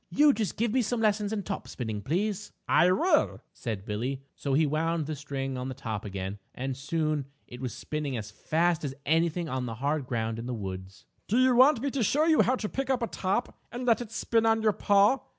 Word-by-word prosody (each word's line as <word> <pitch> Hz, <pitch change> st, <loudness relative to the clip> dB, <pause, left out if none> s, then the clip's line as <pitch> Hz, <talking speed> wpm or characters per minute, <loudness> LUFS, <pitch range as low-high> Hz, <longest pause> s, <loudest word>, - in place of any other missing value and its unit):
You 295 Hz, 0 st, +5 dB
just 220 Hz, -5 st, -2 dB
give 225 Hz, 0 st, 0 dB
me 260 Hz, -, +3 dB
some 240 Hz, +1 st, -1 dB
lessons 210 Hz, -1 st, +1 dB
in 210 Hz, -2 st, -2 dB
top 195 Hz, -, -5 dB
spinning, 110 Hz, -4 st, -4 dB
please." 200 Hz, -, -2 dB
"I 180 Hz, -, +5 dB
will," 310 Hz, -, +2 dB
said 110 Hz, -5 st, -5 dB
Billie. 125 Hz, +6 st, -3 dB
So 140 Hz, -2 st, -1 dB
he 155 Hz, +2 st, +4 dB
wound 160 Hz, +2 st, 0 dB
the 155 Hz, +1 st, -3 dB
string 135 Hz, -2 st, -4 dB
on 125 Hz, -, -4 dB
the 130 Hz, -, -5 dB
top 110 Hz, -6 st, -4 dB
again 95 Hz, 0 st, -5 dB, 0.2 s
and 130 Hz, +1 st, -3 dB
soon 150 Hz, 0 st, -1 dB, 0.2 s
it 125 Hz, +1 st, -10 dB
was 130 Hz, -2 st, -3 dB
spinning 150 Hz, -4 st, -3 dB
as 105 Hz, -1 st, -6 dB
fast 165 Hz, +8 st, 0 dB
as 135 Hz, -2 st, -3 dB
anything 165 Hz, +2 st, +1 dB
on 130 Hz, -3 st, -2 dB
the 115 Hz, -, -4 dB
hard 140 Hz, +2 st, -1 dB
ground 115 Hz, -2 st, -2 dB
in 120 Hz, -, -5 dB
the 125 Hz, -, -2 dB
woods. 95 Hz, -2 st, -7 dB, 0.2 s
"Do 225 Hz, -, +1 dB
you 255 Hz, -1 st, +5 dB
want 260 Hz, 0 st, +6 dB
me 280 Hz, 0 st, -1 dB
to 275 Hz, -, -1 dB
show 285 Hz, +8 st, +3 dB
you 320 Hz, -2 st, +5 dB
how 255 Hz, -, +3 dB
to 220 Hz, -, -3 dB
pick 270 Hz, +4 st, -3 dB
up 260 Hz, -2 st, +1 dB
a -, -, 0 dB
top, 200 Hz, +5 st, -2 dB
and 245 Hz, +1 st, -5 dB
let 230 Hz, -1 st, +3 dB
it 235 Hz, -, -6 dB
spin 230 Hz, -1 st, +1 dB
on 225 Hz, 0 st, +3 dB
your 215 Hz, -1 st, +4 dB
paw?" 205 Hz, +7 st, +4 dB
160 Hz, 230 wpm, -28 LUFS, -, 0.2 s, want